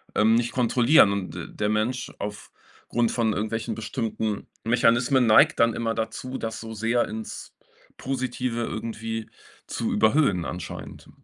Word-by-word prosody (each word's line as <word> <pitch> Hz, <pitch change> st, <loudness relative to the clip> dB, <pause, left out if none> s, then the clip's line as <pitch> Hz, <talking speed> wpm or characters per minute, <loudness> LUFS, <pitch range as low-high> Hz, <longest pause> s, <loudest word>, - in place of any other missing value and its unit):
ähm, 110 Hz, +2 st, +4 dB
nicht 120 Hz, 0 st, 0 dB
kontrollieren 125 Hz, -1 st, +5 dB
und 100 Hz, -4 st, -3 dB
d 85 Hz, -, -6 dB
der 105 Hz, -, -2 dB
Mensch 110 Hz, +4 st, -1 dB
aufgrund 105 Hz, +3 st, -4 dB
von 115 Hz, -3 st, +1 dB
irgendwelchen 110 Hz, +2 st, -2 dB
bestimmten 110 Hz, -2 st, -3 dB, 0.2 s
Mechanismen 120 Hz, +2 st, +3 dB
neigt 110 Hz, -, +6 dB
dann 115 Hz, 0 st, +4 dB
immer 115 Hz, 0 st, -1 dB
dazu, 130 Hz, +3 st, -4 dB
das 110 Hz, 0 st, -4 dB
so 110 Hz, 0 st, -7 dB
sehr 115 Hz, +2 st, +1 dB
ins 110 Hz, 0 st, -7 dB, 0.4 s
Positive 125 Hz, -2 st, -2 dB
irgendwie 115 Hz, 0 st, -4 dB, 0.4 s
zu -, -, -2 dB
überhüllen 110 Hz, -, +3 dB
anscheinend. 90 Hz, 0 st, -7 dB
115 Hz, 135 wpm, -25 LUFS, 110-120 Hz, 0.4 s, neigt